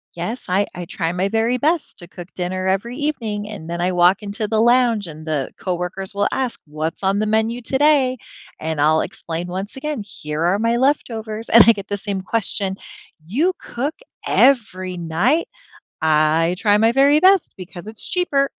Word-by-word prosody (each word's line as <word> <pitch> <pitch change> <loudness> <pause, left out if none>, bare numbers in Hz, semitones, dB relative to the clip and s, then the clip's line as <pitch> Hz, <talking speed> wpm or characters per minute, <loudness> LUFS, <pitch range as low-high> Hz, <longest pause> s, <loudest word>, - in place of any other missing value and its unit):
"Yes, 200 +9 -5
I 195 +3 +2
I 175 -1 -6
try 165 0 -2
my 180 +2 0
very 225 +3 +1
best 315 +4 0
to 175 - -11
cook 175 0 -10
dinner 185 +1 -3
every 200 +6 -1
evening," 225 -9 -3
and 200 -7 -8
then 170 0 -3
I 180 +1 +1
walk 180 +3 +3
into 205 +1 -3
the 220 0 0
lounge, 240 -2 +3
and 155 -2 -10
the 150 -4 -2
coworkers 185 +2 -4
will 200 0 +2
ask, 255 -3 -2
"What's 155 +4 -5
on 195 +1 +2
the 215 - 0
menu 220 +3 0
today?" 265 0 +2 0.4
and 160 -2 -2
I'll 155 +2 +4
explain 170 +1 -5
once 190 +3 -5
again, 295 -3 -3
"Here 150 -6 -6
are 175 +4 +2
my 230 +1 +1
leftovers," 225 -5 -1
and 230 -1 +9
I 230 - +8
get 200 -1 -8
the 205 - 0
same 200 -1 -4
question. 195 -2 -2 0.5
"You 285 - +1
cook 275 +6 -4 0.3
every 185 -9 +2
night?" 175 - +1 0.5
"I 160 +2 +3
try 205 +1 +3
my 225 +2 +3
very 280 +3 +5
best 380 0 +4
because 185 0 -10
it's 220 0 -7
cheaper," 285 -7 +1
205 Hz, 180 wpm, -20 LUFS, 175-240 Hz, 0.5 s, and